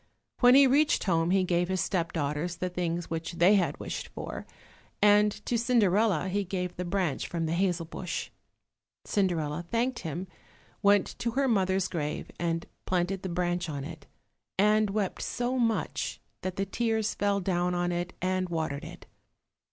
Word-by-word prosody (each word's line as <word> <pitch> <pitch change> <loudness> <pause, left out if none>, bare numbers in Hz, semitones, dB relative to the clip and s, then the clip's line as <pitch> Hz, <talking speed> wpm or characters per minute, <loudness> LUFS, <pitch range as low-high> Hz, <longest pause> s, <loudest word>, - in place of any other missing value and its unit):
When 245 0 +7
he 280 0 +8
reached 285 +3 +3
home 165 -3 +2
he 190 0 +3
gave 175 -1 +1
his 190 0 0
step 170 -3 0
daughters 150 +3 -2
the 180 +2 -2
things 175 -1 -2
which 165 +1 -3
they 175 +4 +5
had 195 -4 +1
wished - - -5
for, - - -7 0.5
and 210 0 +5
to 235 - +1
Cinderella 215 -6 +3
he 200 +2 0
gave 180 -1 -3
the 180 - -4
branch 175 -6 -1
from 165 -1 -2
the 160 - -1
hazel 175 -2 +1
bush. 175 +2 -5 0.7
Cinderella 170 -5 0
thanked 240 +2 0
him, 170 +3 -4 0.5
went 200 -1 +3
to 235 - -1
her 275 +1 +2
mother's 190 -4 +2
grave 150 -3 -4
and 165 -1 -1 0.2
planted 185 +1 0
the 190 - -4
branch 175 0 -1
on 140 -2 -4
it, 155 0 -9 0.5
and 210 +1 +4
wept 200 -2 -2
so 245 +1 -1
much 230 -2 -1 0.2
that 185 -1 -3
the 195 - -1
tears 220 +1 0
fell 200 0 +1
down 180 -1 0
on 175 0 0
it 175 +1 -2
and 185 0 0
watered 160 -4 -2
it. - - -10
185 Hz, 165 wpm, -29 LUFS, 170-205 Hz, 0.7 s, he